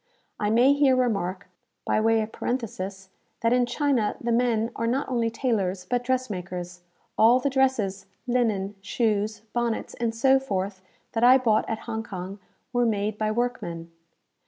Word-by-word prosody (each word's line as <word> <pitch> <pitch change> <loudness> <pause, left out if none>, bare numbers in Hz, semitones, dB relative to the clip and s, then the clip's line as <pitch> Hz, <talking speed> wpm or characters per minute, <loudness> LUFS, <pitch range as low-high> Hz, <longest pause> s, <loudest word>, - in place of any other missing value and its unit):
I 210 - 0
may 245 +5 +5
here 285 -2 +4
remark, 200 -7 -1 0.4
by 215 - +2
way 225 0 +3
of 215 0 -4
parenthesis, 195 -6 -4 0.3
that 230 +1 +3
in 250 -1 +3
China 250 -4 +1
the 235 - -2
men 230 -1 +1
are 230 - -1
not 260 +4 0
only 235 -3 0
tailors, 200 -7 -1
but 245 +3 0
dress 255 0 0
makers. 180 -2 -6 0.4
All 235 +3 +6
the 280 +1 -1
dresses, 220 -8 +1 0.2
linen, 220 -6 0
shoes, 215 0 -1
bonnets, 240 -2 -1
and 230 -1 -2
so 265 +3 +4
forth, 195 -6 -3 0.3
that 225 0 -1
I 255 +2 +8
bought 225 -4 +1
at 220 - -3
Hong 220 -1 -3
Kong, 195 -2 -7 0.3
were 245 0 +2
made 210 -1 -1
by 215 0 +1
workmen. 215 -8 -3
225 Hz, 160 wpm, -26 LUFS, 200-245 Hz, 0.4 s, I